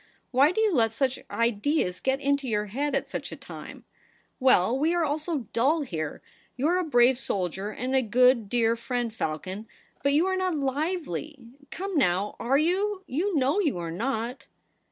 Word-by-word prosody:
Why 275 Hz, +4 st, +5 dB
do 440 Hz, -, -2 dB
you 430 Hz, -3 st, +3 dB
let 225 Hz, -6 st, +3 dB
such 265 Hz, +1 st, 0 dB
ideas 230 Hz, -, 0 dB
get 265 Hz, +1 st, 0 dB
into 280 Hz, -1 st, 0 dB
your 210 Hz, -1 st, 0 dB
head 275 Hz, +7 st, -2 dB
at -, -, -1 dB
such -, -, -5 dB
a -, -, -5 dB
time -, -, -10 dB, 0.2 s
?' -, -, -33 dB
' -, -, -44 dB
Well, 255 Hz, -4 st, +4 dB
we 315 Hz, +6 st, +1 dB
are 340 Hz, -2 st, +2 dB
all 295 Hz, +1 st, -1 dB
so 305 Hz, -5 st, -3 dB
dull 285 Hz, +8 st, +3 dB
here. 160 Hz, -, -4 dB, 0.3 s
You 270 Hz, +4 st, +1 dB
are 360 Hz, +1 st, +2 dB
a -, -, 0 dB
brave 250 Hz, -4 st, +4 dB
soldier 190 Hz, -2 st, -2 dB
and 255 Hz, +5 st, -3 dB
a 265 Hz, -, +4 dB
good, 245 Hz, -1 st, +3 dB
dear 230 Hz, 0 st, +2 dB
friend, 240 Hz, -1 st, -3 dB
Falcon; 185 Hz, +4 st, -4 dB, 0.3 s
but 280 Hz, +1 st, +2 dB
you 310 Hz, +5 st, +4 dB
are 380 Hz, 0 st, +1 dB
not 370 Hz, -2 st, 0 dB
lively. 295 Hz, -, -2 dB, 0.3 s
Come 390 Hz, +1 st, -5 dB
now, 190 Hz, 0 st, +1 dB
are 260 Hz, +4 st, +2 dB
you? 380 Hz, +5 st, 0 dB
You 350 Hz, +8 st, -1 dB
know 275 Hz, +8 st, +2 dB
you 310 Hz, -, +1 dB
are 170 Hz, -1 st, -4 dB
not.' 235 Hz, +5 st, -3 dB
265 Hz, 195 wpm, -27 LUFS, 225-310 Hz, 0.3 s, Why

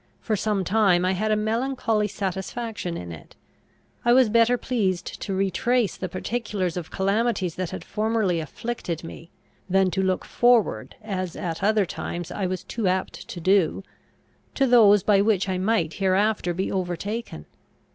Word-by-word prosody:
For 220 Hz, -, -1 dB
some 205 Hz, -1 st, 0 dB
time 185 Hz, -2 st, +3 dB
I 185 Hz, -, +2 dB
had 210 Hz, +3 st, -1 dB
a 215 Hz, -, +3 dB
melancholy 225 Hz, 0 st, 0 dB
satisfaction 195 Hz, 0 st, -4 dB
in 85 Hz, -1 st, -7 dB
it. 80 Hz, -3 st, -12 dB, 0.7 s
I 240 Hz, -, +4 dB
was 255 Hz, -3 st, +5 dB
better 230 Hz, +2 st, +4 dB
pleased 195 Hz, -9 st, -1 dB, 0.2 s
to 195 Hz, -, -3 dB
retrace 195 Hz, +3 st, +1 dB
the 185 Hz, -, -5 dB
particulars 200 Hz, -3 st, -3 dB
of 175 Hz, -3 st, -5 dB
calamities 195 Hz, -2 st, 0 dB
that 185 Hz, -1 st, -3 dB
had -, -, -6 dB
formerly 215 Hz, -5 st, 0 dB
afflicted 170 Hz, +1 st, -5 dB
me, 165 Hz, 0 st, -10 dB, 0.4 s
than 190 Hz, 0 st, +3 dB
to 190 Hz, -, 0 dB
look 185 Hz, -1 st, 0 dB
forward, 240 Hz, -3 st, +2 dB
as 185 Hz, -5 st, -4 dB
at 170 Hz, -4 st, -4 dB
other 210 Hz, -1 st, +3 dB
times 175 Hz, 0 st, -5 dB
I 195 Hz, -3 st, -2 dB
was 185 Hz, 0 st, -4 dB
too 225 Hz, -5 st, -3 dB
apt 185 Hz, +1 st, -2 dB
to 175 Hz, -, -7 dB
do, 190 Hz, 0 st, +2 dB, 0.7 s
to 275 Hz, -, +3 dB
those 210 Hz, -6 st, +6 dB
by 200 Hz, -2 st, +4 dB
which 200 Hz, -2 st, +2 dB
I 185 Hz, -1 st, -1 dB
might 185 Hz, -5 st, +1 dB
hereafter 195 Hz, -1 st, +1 dB
be 190 Hz, +2 st, -2 dB
overtaken. 185 Hz, -, -4 dB
195 Hz, 160 wpm, -24 LUFS, 185-220 Hz, 0.7 s, those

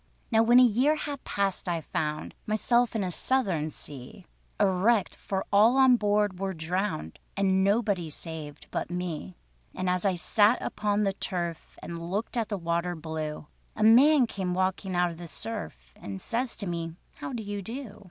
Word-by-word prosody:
Now 225 Hz, -1 st, +5 dB
when 240 Hz, +2 st, +6 dB
a -, -, +8 dB
year 250 Hz, +6 st, +4 dB
had 290 Hz, -3 st, -5 dB
passed 195 Hz, -2 st, -1 dB
I 170 Hz, -1 st, 0 dB
found 150 Hz, 0 st, -3 dB
Myself 235 Hz, +3 st, +2 dB
in 215 Hz, -, 0 dB
a 185 Hz, -, -2 dB
Southern 180 Hz, -, +1 dB
sea, 145 Hz, +6 st, -9 dB, 0.3 s
A 205 Hz, -, +5 dB
wrecked; 200 Hz, +3 st, +2 dB
for 190 Hz, -1 st, -3 dB
all 220 Hz, +6 st, +6 dB
on 260 Hz, -2 st, +7 dB
board 205 Hz, -3 st, +1 dB
were 195 Hz, -1 st, -2 dB
drowned, 160 Hz, -, -3 dB, 0.2 s
And 190 Hz, -1 st, +3 dB
nobody 200 Hz, -4 st, +1 dB
saved 150 Hz, -1 st, -7 dB
but -, -, -3 dB
me. 175 Hz, -, -4 dB, 0.4 s
And 185 Hz, -, -2 dB
as 180 Hz, 0 st, +1 dB
I 195 Hz, -2 st, +2 dB
sat 210 Hz, +6 st, +3 dB
upon 210 Hz, 0 st, -1 dB
the 195 Hz, -1 st, +1 dB
turf, 175 Hz, -4 st, -4 dB
And 170 Hz, 0 st, -6 dB
looked 205 Hz, +7 st, -2 dB
at 230 Hz, -3 st, -1 dB
the 205 Hz, -, -2 dB
water 170 Hz, 0 st, -1 dB
blue, 155 Hz, -1 st, -5 dB, 0.3 s
A 215 Hz, -, -1 dB
man 260 Hz, +5 st, +7 dB
came 185 Hz, -5 st, -3 dB
walking 185 Hz, 0 st, -1 dB
out 175 Hz, 0 st, +2 dB
of 165 Hz, -, -10 dB
the 175 Hz, -, -7 dB
surf, 160 Hz, -, -6 dB
And 95 Hz, -1 st, -7 dB
says 240 Hz, -, -2 dB
to 200 Hz, -, -5 dB
me: 165 Hz, -2 st, -4 dB, 0.2 s
"How -, -, -6 dB
do 235 Hz, -4 st, -4 dB
you 205 Hz, 0 st, -4 dB
do? 225 Hz, +1 st, -7 dB
195 Hz, 180 wpm, -28 LUFS, 170-220 Hz, 0.4 s, a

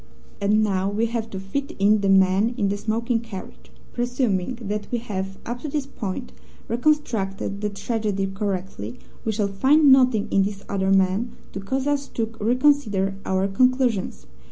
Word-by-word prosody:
"And 210 Hz, +2 st, +3 dB
now 195 Hz, -2 st, +1 dB
we 215 Hz, +3 st, 0 dB
have 230 Hz, -1 st, -3 dB
to 190 Hz, -, -5 dB
fit 275 Hz, +9 st, -4 dB
in 205 Hz, +1 st, +4 dB
the 200 Hz, -, +1 dB
man 195 Hz, +4 st, +4 dB
in 200 Hz, -4 st, +1 dB
the 200 Hz, -, -1 dB
smoking 230 Hz, +3 st, 0 dB
carriage. 225 Hz, -5 st, -10 dB, 0.2 s
Presuming 240 Hz, -3 st, -1 dB
that 210 Hz, -2 st, -4 dB
we 240 Hz, -, +1 dB
have, 195 Hz, -4 st, -4 dB
up 240 Hz, +1 st, -4 dB
to -, -, -4 dB
this 290 Hz, -1 st, -2 dB
point, 245 Hz, -2 st, -5 dB, 0.4 s
reconstructed 225 Hz, -7 st, 0 dB
the 210 Hz, -, 0 dB
tragedy 205 Hz, -1 st, -2 dB
correctly, 195 Hz, -, -4 dB, 0.3 s
we 220 Hz, -, +1 dB
shall 210 Hz, -1 st, 0 dB
find 270 Hz, +9 st, +4 dB
nothing 255 Hz, -5 st, +5 dB
in 195 Hz, -, +4 dB
this 200 Hz, 0 st, -2 dB
other 190 Hz, -1 st, 0 dB
man 195 Hz, +4 st, +2 dB, 0.2 s
to -, -, -4 dB
cause 260 Hz, +7 st, -2 dB
us 285 Hz, -1 st, 0 dB
to 225 Hz, -1 st, -3 dB
reconsider 230 Hz, -5 st, +2 dB
our 190 Hz, +1 st, +1 dB
conclusions. 230 Hz, -, +1 dB
210 Hz, 165 wpm, -23 LUFS, 195-245 Hz, 0.4 s, nothing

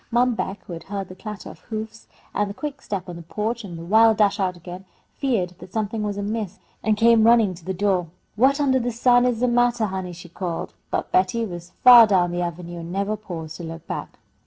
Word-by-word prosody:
Mom 245 Hz, +1 st, +3 dB
Beck, 200 Hz, -2 st, -4 dB
who 175 Hz, -, -7 dB
had 165 Hz, -, -8 dB
heard 195 Hz, -1 st, -5 dB
the 185 Hz, -, -10 dB
clatter 210 Hz, +1 st, -8 dB
of -, -, -15 dB
hoofs, 220 Hz, 0 st, -7 dB, 0.3 s
the 200 Hz, 0 st, -1 dB
quick 290 Hz, -2 st, -5 dB
step 195 Hz, -2 st, -4 dB
on 175 Hz, -1 st, -7 dB
the -, -, -8 dB
porch, 215 Hz, +7 st, -3 dB
and 175 Hz, -4 st, -8 dB
the 165 Hz, -, -8 dB
wild 220 Hz, +3 st, +5 dB
dash 205 Hz, -1 st, +3 dB
out 185 Hz, -2 st, -1 dB
again, 180 Hz, +2 st, -9 dB, 0.4 s
feared 230 Hz, -10 st, 0 dB
that 185 Hz, -, -12 dB
something 215 Hz, +1 st, -2 dB
was 205 Hz, -1 st, -2 dB
amiss, 205 Hz, -1 st, -3 dB, 0.2 s
and 215 Hz, 0 st, +1 dB
came 230 Hz, 0 st, +5 dB
running 225 Hz, -4 st, +5 dB
to 170 Hz, -1 st, -13 dB
the 190 Hz, -, -3 dB
door. 190 Hz, -2 st, 0 dB, 0.3 s
"What 265 Hz, +6 st, +3 dB
undah 265 Hz, -2 st, +3 dB
the 245 Hz, -, -1 dB
sun 245 Hz, +1 st, +4 dB
is 240 Hz, -2 st, -1 dB
the 250 Hz, -, +3 dB
mattah, 240 Hz, -2 st, +2 dB
honey?" 190 Hz, -1 st, -4 dB
she 175 Hz, +1 st, -11 dB
called, 170 Hz, 0 st, -5 dB, 0.2 s
but -, -, -2 dB
Betty 190 Hz, +5 st, +2 dB
was 175 Hz, -2 st, -8 dB
far 240 Hz, -2 st, +10 dB
down 180 Hz, -4 st, +2 dB
the 175 Hz, 0 st, -2 dB
avenue, 175 Hz, 0 st, -5 dB
and 165 Hz, +1 st, -7 dB
never 200 Hz, +3 st, -1 dB
paused 170 Hz, -7 st, -7 dB
to 175 Hz, -, -8 dB
look 165 Hz, 0 st, -8 dB
back. -, -, -6 dB
205 Hz, 230 wpm, -23 LUFS, 180-230 Hz, 0.4 s, far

